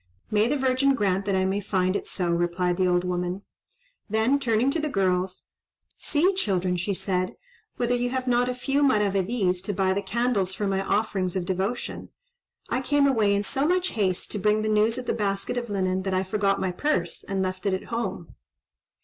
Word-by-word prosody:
"May 210 +1 +3
the 295 +4 +1
Virgin 265 +1 +2
grant 195 -3 0
that 195 - +1
I 190 +1 +1
find 185 -2 0
it - - -3
so," 175 -2 -1
replied 175 +1 0
the 185 -1 +2
old 175 0 +2
woman. 180 +1 -2 0.7
Then 220 +6 +2
turning 240 0 +2
to 325 - -1
the 305 - -1
girls, 185 -4 -1 0.5
"See, 345 +6 +2
children," 185 - 0
she 180 +3 -1
said 185 -1 -1 0.4
"whether 245 0 +1
you 245 0 0
have 260 0 -2
not 245 0 +2
a 250 - -2
few 275 +3 0
maravedis 200 -6 +2
to 205 - -3
buy 190 0 +1
the 200 - -1
candles 200 -2 0
for 210 - -2
my 195 -1 0
offerings 195 -3 0
of 185 -2 -1
devotion. 195 +6 -3 0.6
I 255 - -1
came 285 +2 +2
away 220 -7 +3
in 200 - 0
so 270 +8 0
much 365 +1 +1
haste, 190 -5 -1
to 210 - -2
bring 210 +2 +2
the 215 - 0
news 215 +2 +3
of 255 - -4
the - - 0
basket 200 0 -1
of 240 -2 -3
linen, 190 -2 0
that 190 0 -1
I 185 - +1
forgot 195 0 0
my 185 - -1
purse, 180 - -1
and 195 -1 -2
left 185 +1 -3
it 195 - +2
at 190 - -8
home." 235 +1 -3
200 Hz, 200 wpm, -26 LUFS, 185-245 Hz, 0.7 s, May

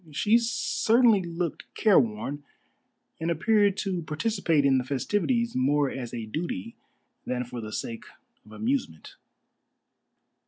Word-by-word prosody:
She 210 +10 +3
certainly 235 -2 +3
looked 170 -1 -4
careworn, 140 - +2 0.8
and 165 +1 -2
appeared 205 +3 +2
to 190 -4 -2
participate 160 -2 0
in 135 -1 +4
the - - -2
festivities 205 - -1
more 140 +2 +2
as 125 -3 -6
a 115 -2 -5
duty 115 - -4 0.5
than 125 0 -2
for 120 -1 -7
the 110 -1 -7
sake 115 +1 -5 0.4
of 105 - -18
amusement. 110 - -3
150 Hz, 120 wpm, -27 LUFS, 125-205 Hz, 0.8 s, in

